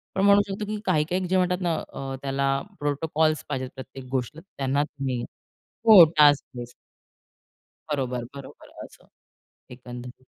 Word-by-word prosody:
पण 190 - +1
म्हणू 200 0 +6
शकतो 200 +2 -4
की 210 0 -4
काही-काही 180 +2 0
जे 185 +1 +1
म्हणतात 180 0 +1
ना 170 -2 0 0.2
अ, 135 -1 -5
त्याला 135 0 0 0.2
प्रोटोकॉल्स 155 +2 0
पाहिजेत 130 -1 -3
प्रत्येक 130 0 -10
गोष्ट, 130 +4 -3
त्यांना 140 -5 -2
तुम्ही, 135 -5 -4 0.7
हो. 200 -6 +10
Task 145 -1 +6
base. 120 0 -7 1.2
बरोबर, 125 -4 -2
बरोबर. 140 -1 -12 0.2
असं - - -19 0.6
एकंदरीत. 125 +1 -10
145 Hz, 135 wpm, -25 LUFS, 130-175 Hz, 1.2 s, हो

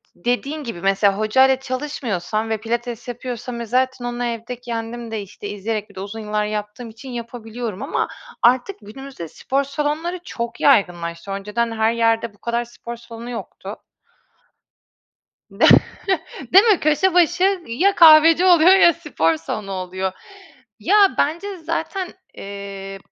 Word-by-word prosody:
dediğin 275 - -2
gibi 230 -8 -6
mesela 195 0 +2
hocayla 260 +5 +4
çalışmıyorsam 235 - -3
ve 220 - 0
pilates 235 +1 -4
yapıyorsam 245 0 -6
ve 235 - -4
zaten 255 +1 0
onu 245 0 -3
evde 235 +1 -5
kendim 230 -1 -5
de 220 -2 -3
işte 200 +1 -9
izleyerek 210 +1 -4
bir - - -19
de - - -7
uzun 205 +3 -7
yıllar 210 -1 -1
yaptığım 210 +3 -5
için 225 +4 -11
yapabiliyorum. 235 -3 -6
Ama - - -1 0.4
artık 255 +11 +3
günümüzde 220 -4 -9
spor 275 - -2
salonları 300 +5 -2
çok 235 -1 -5
yaygınlaştı. 175 -7 +2
Önceden 210 +4 -2
her 220 0 +1
yerde 230 -1 +1
bu - - -24
kadar 235 0 -1
spor 235 0 -9
salonu 230 0 -10
yoktu. 235 - -8 1.7
De - - 0 0.9
Değil 390 +3 +8
mi? 425 -6 +4
Köşe 310 +5 +2
başı 360 +2 +3
ya 355 +13 +2
kahveci 325 +1 +7
oluyor 355 -1 +6
ya 345 -3 +6
spor 165 - 0
salonu 195 +5 -5
oluyor. 185 0 -3 0.7
Ya 405 -1 +4
bence 360 +7 -1
zaten, 335 +3 -3 0.3
eee, 195 -1 -8
235 Hz, 140 wpm, -21 LUFS, 210-280 Hz, 1.7 s, Değil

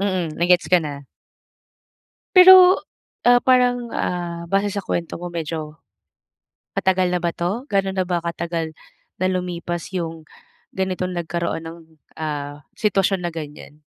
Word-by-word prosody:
Mm, 185 -5 -1
na 170 - +2
gets 180 0 +4
ko 180 - +6
na. 145 -2 -6 1.3
Pero 370 0 +9 0.4
ah, 245 0 +6
parang 245 -1 +2
ah, 175 -1 -3
base 195 +1 +2
sa 200 0 -3
kuwento 170 -2 -3
mo 175 - -5
medyo, 155 -2 -5 1.0
matagal 185 -1 +2
na 180 - 0
ba 170 - +1
'to? 200 +10 -3
Gano 195 -1 +1
na 190 -1 -1
ba 175 -2 -1
katagal 170 -1 -3 0.5
na 185 - +1
lumipas 175 -2 -4
yung 165 -2 -4 0.5
ganitong 185 -1 -2
nagkaroon 170 -1 -3
ng 165 +1 -9 0.4
ah, 145 -1 -5 0.2
sitwasyon 195 -3 +1
na 170 - -4
ganyan? 150 -1 -9
175 Hz, 140 wpm, -21 LUFS, 165-195 Hz, 1.3 s, Pero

